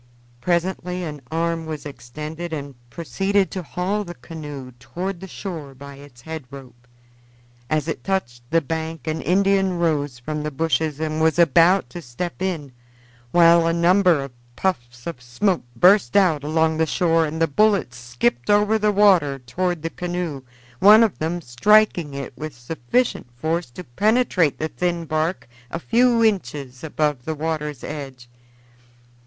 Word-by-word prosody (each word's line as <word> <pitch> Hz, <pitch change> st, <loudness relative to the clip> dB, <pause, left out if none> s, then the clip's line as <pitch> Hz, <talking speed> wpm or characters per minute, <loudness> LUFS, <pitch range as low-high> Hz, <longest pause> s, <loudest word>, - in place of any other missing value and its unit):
Presently 180 Hz, +2 st, -1 dB
an 150 Hz, -4 st, -6 dB
arm 165 Hz, 0 st, -1 dB
was 155 Hz, -2 st, -6 dB
extended 155 Hz, +5 st, -7 dB
and 140 Hz, -2 st, -5 dB, 0.2 s
proceeded 195 Hz, +7 st, 0 dB
to 185 Hz, -, -4 dB
haul 185 Hz, +5 st, -2 dB
the 175 Hz, -2 st, -9 dB
canoe 145 Hz, -2 st, -8 dB
toward 180 Hz, +7 st, -5 dB
the 190 Hz, -, -8 dB
shore 160 Hz, -8 st, -7 dB
by 140 Hz, +2 st, -10 dB
its 140 Hz, -4 st, -15 dB
head 160 Hz, 0 st, -7 dB
rope. 125 Hz, -3 st, -13 dB, 0.8 s
As 155 Hz, -1 st, 0 dB
it 160 Hz, -, -4 dB
touched 120 Hz, -12 st, -2 dB
the 165 Hz, 0 st, +3 dB
bank 160 Hz, +2 st, -4 dB
an 160 Hz, 0 st, -2 dB
Indian 195 Hz, 0 st, +2 dB
rose 145 Hz, -6 st, 0 dB
from 150 Hz, +4 st, -4 dB
the 150 Hz, -, -2 dB
bushes 155 Hz, 0 st, -1 dB
and 155 Hz, 0 st, -2 dB
was 160 Hz, 0 st, +3 dB
about 170 Hz, +3 st, +5 dB
to 175 Hz, -, -7 dB
step 165 Hz, +8 st, -6 dB
in, 165 Hz, -8 st, -2 dB, 0.6 s
while 170 Hz, +2 st, +5 dB
a 165 Hz, -, +2 dB
number 175 Hz, -2 st, +4 dB
of 135 Hz, -, -8 dB, 0.2 s
puffs 120 Hz, -10 st, -3 dB
of 165 Hz, -7 st, -6 dB
smoke 170 Hz, +10 st, 0 dB
burst 180 Hz, -, +5 dB
out 165 Hz, -7 st, +3 dB
along 160 Hz, +1 st, +1 dB
the 160 Hz, 0 st, +2 dB
shore 165 Hz, 0 st, +2 dB
and 160 Hz, +2 st, -5 dB
the 165 Hz, -, +4 dB
bullets 195 Hz, -, +2 dB
skipped 120 Hz, 0 st, -1 dB
over 210 Hz, +1 st, +4 dB
the 210 Hz, 0 st, +2 dB
water 190 Hz, -9 st, +4 dB
toward 165 Hz, +7 st, -3 dB
the 165 Hz, -, -3 dB
canoe, 175 Hz, -5 st, -4 dB, 0.4 s
one 215 Hz, +3 st, +8 dB
of 220 Hz, -5 st, 0 dB
them 165 Hz, +3 st, -2 dB
striking 170 Hz, -, +3 dB
it 140 Hz, -3 st, -6 dB
with 155 Hz, -3 st, -7 dB
sufficient 120 Hz, -, -1 dB
force 160 Hz, +2 st, -1 dB
to 150 Hz, +9 st, -9 dB
penetrate 190 Hz, -, +1 dB
the 155 Hz, -, -2 dB
thin 170 Hz, 0 st, -2 dB
bark 155 Hz, 0 st, -1 dB, 0.2 s
a 165 Hz, -, -4 dB
few 235 Hz, +5 st, +3 dB
inches 145 Hz, -, -1 dB
above 150 Hz, -4 st, -1 dB
the 160 Hz, +3 st, -3 dB
water's 150 Hz, -3 st, -3 dB
edge. 135 Hz, -5 st, -7 dB
160 Hz, 160 wpm, -22 LUFS, 145-180 Hz, 0.8 s, one